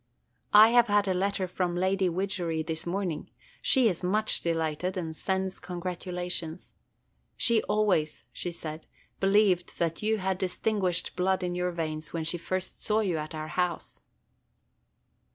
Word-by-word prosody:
I 215 +2 +10
have 240 0 +5
had 205 -1 +3
a 190 - +2
letter 195 +1 0
from 180 -1 -1
Lady 190 +1 +1
Widgery 175 -3 -1
this 160 +1 -4
morning. 175 -4 -2 0.3
She 260 -4 +5
is 180 -6 -1
much 210 +4 +1
delighted, 165 +2 -1
and 160 -3 -4
sends 190 +2 -2
congratulations. 180 -1 -4 0.6
She 230 -2 +4
always, 205 -8 +1
she 175 - -3
said, 160 -1 -7 0.3
believed 195 -2 +3
that 165 -1 -1
you 220 +1 +1
had 190 -2 -1
distinguished 185 -1 0
blood 185 +1 +1
in 175 0 -1
your 180 0 0
veins 155 -2 -4
when 165 -1 -2
she 165 +2 0
first 185 +2 -4
saw 215 +1 +2
you 180 -7 0
at 155 +1 -6
our 155 0 -5
house." 180 +2 -2
180 Hz, 150 wpm, -28 LUFS, 170-195 Hz, 0.6 s, I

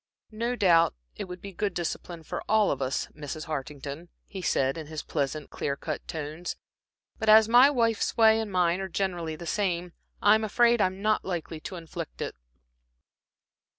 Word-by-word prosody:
"No 235 +3 -2
doubt, 175 -7 +4 0.2
it - - -5
would 180 -1 -9
be 200 -1 -8
good 200 -1 -2
discipline 170 0 -4
for - - -5
all 215 -1 +4
of 140 - -3
us, 130 +1 -1
Mrs. 150 +1 -6
Hartington," 150 +2 -6 0.2
he 190 - -7
said, 135 -6 +1
in 160 -2 -7
his 155 -1 -5
pleasant, 145 0 -3
clear 140 - -2
cut 155 +1 -5
tones, 160 +2 -5 0.6
"but 220 - 0
as 215 0 +8
my 245 +4 +7
wife's 230 -6 +1
way 220 -1 +6
and 220 -2 -3
mine 180 0 +2
are 190 - -4
generally 175 -4 -2
the 170 - -9
same, 175 -2 -1 0.3
I'm 215 +2 +5
afraid 235 +2 +3
I'm 190 +1 0
not 215 0 +2
likely 170 -3 -4
to 185 - -7
inflict 160 - -7
it." - - -3
180 Hz, 175 wpm, -28 LUFS, 155-215 Hz, 0.6 s, as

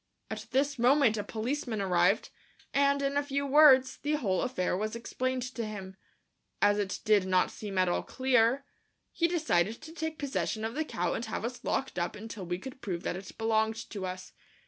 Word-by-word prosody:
At - - -5
this 275 +1 +1
moment 250 -2 +5
a 210 - -2
policeman 235 +1 -3
arrived, 185 +1 +2 0.4
and, 280 0 +3
in 275 +1 0
a - - +4
few 280 0 -2
words, 270 -2 +6
the 295 +1 -2
whole 205 -11 0
affair 185 -8 -1
was 215 +4 -2
explained 255 +2 -2
to 235 - -3
him. 195 -3 -6 0.6
As 205 0 +4
it 195 -2 -2
did 205 -3 +4
not 185 -1 +2
seem 200 -3 -6
at 185 0 +4
all 175 - +1
clear, 260 0 +2 0.5
he 335 - +2
decided 230 - +1
to 315 - -9
take 320 -1 -4
possession 260 -6 -2
of 225 - -3
the 310 +3 -1
cow 175 - -1
and 235 - -3
have 220 0 -4
us 245 +1 -5
locked 265 -8 -1
up 175 - -2
until 210 -3 -7
we 175 0 -1
could 260 +6 -9
prove 180 -4 -4
that - - -2
it 190 +1 -9
belonged 220 0 +1 0.2
to 195 -3 -4
us. 185 0 -7
225 Hz, 195 wpm, -30 LUFS, 195-275 Hz, 0.6 s, words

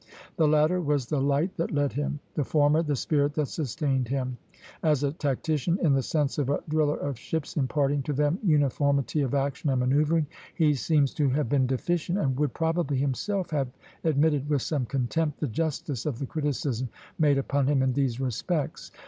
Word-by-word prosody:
The 160 -4 +3
latter 155 +4 +3
was 145 -5 0
the 140 +2 -1
light 145 +7 +1
that 165 - -1
led 145 -2 0
him, 145 0 -2
the 150 - 0
former 150 +3 +3
the 150 -3 0
spirit 145 +2 0
that 150 - +1
sustained 135 -3 -1
him. 130 0 -2 0.5
As 150 -3 +2
a 140 - +1
tactician, 155 +3 -1
in 150 -5 +4
the 135 - +3
sense 145 +2 -1
of 140 -2 0
a 145 - 0
driller 150 -1 +1
of 140 -4 -4
ships, 160 -3 -4
imparting 140 0 +1
to 145 +2 -3
them 150 +6 +1
uniformity 145 - +2
of 135 0 0
action 140 +1 -1
and 130 -2 +2
manoeuvring, 150 +5 +2 0.3
he 155 -3 +3
seems 145 0 +2
to 145 -3 +1
have 135 -2 0
been 130 -2 +2
deficient, 170 +7 -1
and 135 -9 0
would 150 -4 0
probably 160 -4 0
himself 170 +9 -1
have 140 -4 0 0.4
admitted, 150 -2 +2
with 145 -4 +1
some 140 -6 -1
contempt, 145 +4 -1
the - - 0
justice 145 0 -2
of 140 -6 -2
the 140 - -3
criticism 135 -4 -2 0.3
made 145 -3 +4
upon 135 0 0
him 140 -2 +3
in 130 -1 +1
these 130 -3 0
respects. 135 - -2
145 Hz, 190 wpm, -27 LUFS, 135-155 Hz, 0.5 s, in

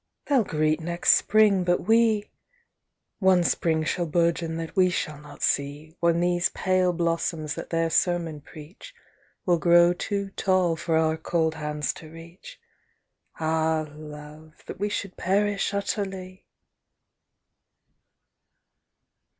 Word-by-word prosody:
"They'll 275 -5 +3
greet 155 -3 0
next 170 +1 +2
Spring, 210 -3 +3
but 175 0 +1
we 225 -1 +3
â! - - -32 0.9
One 190 -3 +4
Spring 160 -2 +1
shall 170 +2 -1
bourgeon 165 0 0
that 165 +3 -6
we 185 -2 +4
shall 150 -4 -3
not 145 -1 -11
see. 145 +3 -1
When 170 -1 +2
these 175 0 +1
pale 185 -1 +1
blossoms 165 -2 -2
that - - -7
their 165 -1 0
sermon 170 -4 0
preach 170 - -13 0.5
Will 175 -2 +2
grow 175 +1 +5
too 200 +2 -3
tall 185 -4 +1
for 160 0 -1
our 160 0 +1
cold 160 0 0
hands 150 -1 -3
to 160 - -12
reach. 170 - -13 0.8
Ah, 160 0 0
love, 150 +1 -12
that - - -9
we 205 +1 -1
should 195 -2 -5
perish 200 +1 0
utterly!" 195 -2 -4
170 Hz, 125 wpm, -25 LUFS, 160-185 Hz, 0.9 s, grow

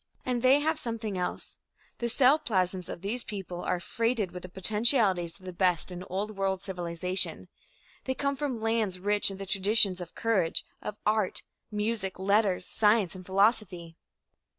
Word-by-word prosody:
And 250 -2 -1
they 265 +3 +5
have 315 +1 0
something 225 -5 -4
else. 180 -1 -4 0.4
The 235 - -1
cell 265 +5 +5
plasms 185 - -1
of - - -6
these 230 +5 -2
peoples 185 -4 -6
are 180 - 0
freighted 230 0 -1
with 180 - -7
the 185 - -9
potentialities 195 -3 +2
of 185 - -16
the 185 - -6
best 180 -1 +1
in 180 0 -6
Old 205 +3 -3
World 195 -1 -1
civilization. 180 0 -2 0.6
They 260 - -1
come 280 +1 -1
from 270 -5 -3
lands 220 -4 0
rich 205 +2 +2
in 195 - -5
the 195 - -6
traditions 195 -1 +3
of 175 - -9
courage, 200 -8 0 0.2
of 210 - -5
art, 215 -2 +1 0.3
music, 210 -3 -2
letters, 195 -1 +2
science 210 -3 +2
and 185 -1 -9
philosophy. 190 -3 +1
200 Hz, 165 wpm, -29 LUFS, 185-225 Hz, 0.6 s, they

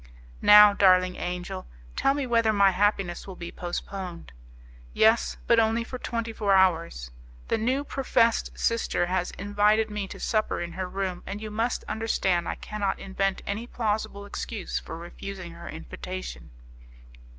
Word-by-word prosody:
"Now, 210 0 +9
darling 185 -2 +4
angel, 180 +1 -5 0.3
tell 275 +1 +2
me 285 -2 -1
whether 230 -2 +3
my 200 -2 +5
happiness 195 -2 0
will 190 - -7
be 170 -1 -7
postponed." 175 - -6 0.6
"Yes, 225 +1 +3
but 235 -1 +5
only 225 +1 +2
for 255 +2 -7
twenty 230 -2 -3
four 200 -3 +2
hours; 165 - +2 0.4
the - - +1
new 260 +5 0
professed 240 -5 +1
sister 230 -6 +1
has 180 0 -1
invited 205 +2 +2
me 210 -2 -3
to - - -9
supper 215 -1 0
in 170 0 -4
her 185 +2 -4
room, 190 -2 -3
and 200 +1 -4
you 215 0 -6
must 225 +3 -1
understand 190 -6 0
I - - -2
cannot 210 -2 -3
invent 195 0 -2
any 215 +4 -3
plausible 210 -3 -2
excuse 205 0 -4
for - - -8
refusing 175 +1 -8
her 170 +1 -10
invitation." 175 - -7
200 Hz, 150 wpm, -26 LUFS, 180-220 Hz, 0.6 s, Now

